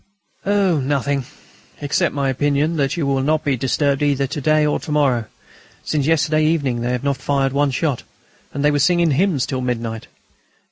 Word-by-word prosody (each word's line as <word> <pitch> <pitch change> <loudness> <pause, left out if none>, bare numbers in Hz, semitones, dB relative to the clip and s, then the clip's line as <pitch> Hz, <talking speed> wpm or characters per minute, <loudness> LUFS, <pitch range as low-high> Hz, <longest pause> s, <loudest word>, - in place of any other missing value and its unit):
"Oh! 195 -5 +2
nothing, 140 0 -1 0.5
except 145 0 0
my 140 -1 0
opinion 145 +4 0
that 140 +3 0
you 160 - -1
will 135 -1 +1
not 155 +3 +1
be 140 -2 +1
disturbed 135 +2 0
either 140 -2 +1
to 140 +2 -5
day 155 +2 +3
or 150 - 0
to - - -7
morrow. 135 -6 +2 0.6
Since 150 -2 -1
yesterday 155 -1 +2
evening 145 -7 0
they 120 - -1
have 125 0 -2
not 140 -1 0
fired 135 0 0
one 145 0 +2
shot, 135 0 -1 0.5
and 140 +1 -2
they 150 - +4
were 145 - +1
singing 170 +2 +3
hymns 155 -2 +1
till 130 -2 -3
midnight. 115 -3 -3
140 Hz, 185 wpm, -20 LUFS, 135-155 Hz, 0.6 s, they